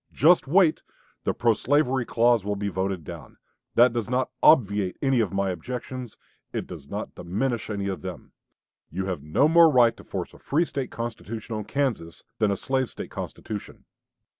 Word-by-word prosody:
just 165 0 +5
wait; 170 +1 +4 0.4
the - - +2
pro 120 -1 +2
slavery 130 0 +1
clause 120 -2 +3
will 105 0 -1
be 100 0 -2
voted 95 -2 -2
down.' - - -10 0.4
That 120 0 +6
does 115 -3 -2
not 130 +1 0
obviate 100 - +4
any 135 -3 +2
of 110 -4 +1
my 100 -1 0
objections; 125 +4 -6 0.3
it - - -3
does - - -10
not - - -5
diminish 115 +6 -2
any 100 -2 -2
of 95 -2 -3
them. 90 -2 -8 0.6
You 95 +3 -3
have 90 -6 -3
no 75 - +3
more 165 +1 +7
right 125 -5 +5
to - - -13
force - - -5
a - - -15
free 160 +5 +1
State 135 -5 -4
constitution 115 -1 -5
on 105 -1 -4
Kansas 110 -10 -2 0.2
than 105 - +3
a 100 - 0
slave 130 0 -1
State - - -8
constitution. 105 -2 -7
115 Hz, 180 wpm, -25 LUFS, 100-130 Hz, 0.6 s, more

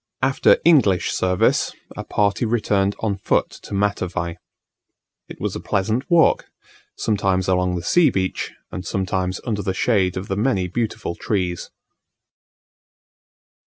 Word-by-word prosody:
After 135 +1 +4
English 130 - +4
service, 90 -1 +1 0.2
a - - -5
party 100 +2 0
returned 105 -4 +1
on 105 -3 -1
foot - - 0
to - - -7
Matavai. 90 -4 -1 0.9
It - - -10
was - - -3
a - - -3
pleasant 110 +7 -1
walk, 170 -2 +4 0.5
sometimes 95 -4 0
along 90 -1 +1
the 85 - -4
sea 165 - +4
beach 95 -5 -2 0.2
and 90 - -5
sometimes 95 -1 -2
under 105 -4 -1
the 95 -1 -2
shade 95 -3 +1
of 95 +2 -5
the 95 - -2
many 100 -4 +1
beautiful 110 -1 -3
trees. 90 -3 -2
100 Hz, 130 wpm, -21 LUFS, 90-110 Hz, 0.9 s, After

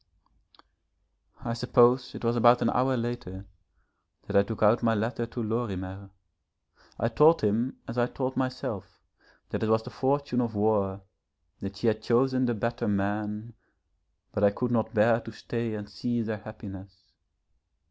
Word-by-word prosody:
I 115 - -1
suppose 125 +1 +3
it - - -8
was 115 +1 +2
about 120 +1 +5
an - - +2
hour 130 +1 +2
later 115 -5 -4 0.8
that - - -5
I 100 - +7
took 110 +2 -3
out 110 +3 +5
my 115 -1 +2
letter 115 +2 -1
to 120 0 -5
Lorimer. 100 -4 -3 0.9
I 115 - +1
told 150 +8 +5
him 110 +5 0
as 115 +2 -3
I 120 - +3
told 130 0 -3
myself, 130 -8 -3 0.5
that - - -2
it 110 - 0
was 110 0 +3
the - - -9
fortune 135 -2 0
of 115 -2 -2
war, 100 -2 +1 0.6
that 100 +1 -6
she 110 - -4
had 110 -1 +2
chosen 130 +3 +2
the 120 - 0
better 115 +3 -2
man, 105 +3 -2 0.8
but 100 - -2
I 100 - +7
could 120 +4 -2
not 110 -2 +1
bear 115 +1 +4
to 115 -1 -9
stay 115 +1 -4
and 105 -1 -6
see 115 +4 -2
their 110 0 -3
happiness. 95 -3 -11
115 Hz, 160 wpm, -28 LUFS, 105-120 Hz, 0.9 s, I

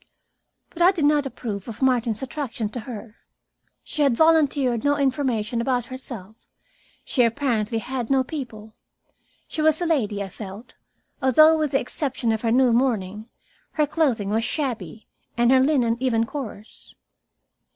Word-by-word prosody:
But 345 - -7
I 350 - +7
did 335 -6 -1
not 290 -1 +3
approve 210 -7 -6
of 230 -2 -8
Martin's 245 -4 +1
attraction 250 -6 -4
to 245 - -6
her. 225 -1 -9 0.7
She 305 - -4
had 275 -5 +3
volunteered 285 -7 +3
no 285 0 +2
information 255 -5 0
about 245 -1 0
herself, 225 -5 -8 0.7
she 255 - +1
apparently 230 -2 +1
had 245 0 -4
no 270 -1 +3
people. 235 -7 -7 0.7
She 310 - -3
was 315 0 +3
a 350 - -1
lady, 220 -11 0
I 195 - -7
felt, 205 +4 -10 0.5
although, 310 +5 +6
with 305 -3 -1
the 270 - +4
exception 255 -3 -2
of 220 -1 -1
her 230 - 0
new 250 0 +4
mourning, 220 -3 0 0.4
her 305 - +2
clothing 260 -10 0
was 225 +2 +1
shabby 225 - -4 0.3
and 240 +1 +4
her 265 - +6
linen 260 -4 +2
even 235 -3 +1
coarse. 230 -6 -9
250 Hz, 150 wpm, -23 LUFS, 225-285 Hz, 0.7 s, I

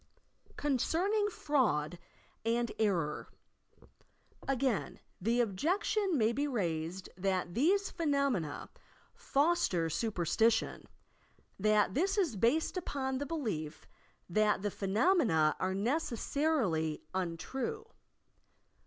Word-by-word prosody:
CONCEBNINQ 355 - +1
FRAUD 190 - 0 0.4
AND 235 +1 0
ERROR 175 -9 0 1.2
Again 265 -4 0 0.2
the 235 +5 +2
objection 350 - 0
may 220 -2 +3
be 285 +4 0
raised 180 - -2
that 185 -1 -1
these 385 - +2
phe 335 - -4
nomena 275 - 0 0.5
"foster 275 - +1
superstition," 220 +3 +1 0.7
but 210 -1 +3
this 380 - +1
is 340 - +1
based 260 - +1
upon 265 -6 -2
the 285 - -3
belief 210 - -4 0.4
that 210 +2 +2
the 205 - 0
phenomena 200 - +2
are 190 0 -1
necessarily 235 - 0
untrue. 220 - -3
230 Hz, 90 wpm, -32 LUFS, 185-295 Hz, 1.2 s, may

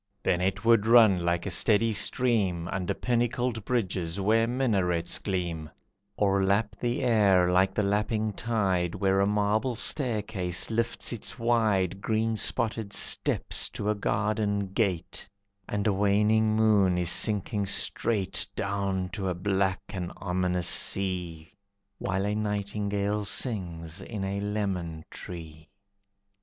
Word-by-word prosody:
Then 90 -1 +1
it 95 +4 -1
would 115 -2 +4
run 110 -7 +6
like 85 0 0
a 100 - -2
steady 110 +4 +4
stream 100 -7 +1
Under 95 -3 -2
pinnacled 120 -1 -1
bridges 95 -7 -1
where 110 +3 +2
minarets 95 -9 0
gleam, 85 -5 -3 0.5
Or 100 -1 +2
lap 100 +3 +1
the 120 +2 -1
air 100 -7 +4
like 95 +1 +2
the 105 - +1
lapping 105 +1 0
tide 95 -6 -1
Where 95 0 +1
a 100 - +3
marble 105 +4 +1
staircase 110 - -1
lifts 115 +2 -1
its 120 - -5
wide 110 -6 +1
Green 110 +1 0
spotted 110 -1 -1
steps - - +1
to 105 +1 -2
a - - +2
garden 100 -1 -1
gate, 95 -3 -1 0.4
And 100 -1 -2
a 105 - +3
waning 105 +2 +2
moon 105 -5 +3
is 90 -1 +1
sinking 105 -1 0
straight 100 +1 -1
Down 100 -2 -2
to 95 -1 -3
a 90 - -2
black 95 0 0
and 90 -3 -5
ominous 90 -1 -1
sea, 90 -4 -1 0.5
While 95 +1 -1
a 105 - 0
nightingale 105 0 -2
sings 90 -7 -2
in 100 0 -6
a 100 +1 -2
lemon 95 -6 -3
tree. 80 -3 -9
100 Hz, 130 wpm, -27 LUFS, 95-110 Hz, 0.5 s, run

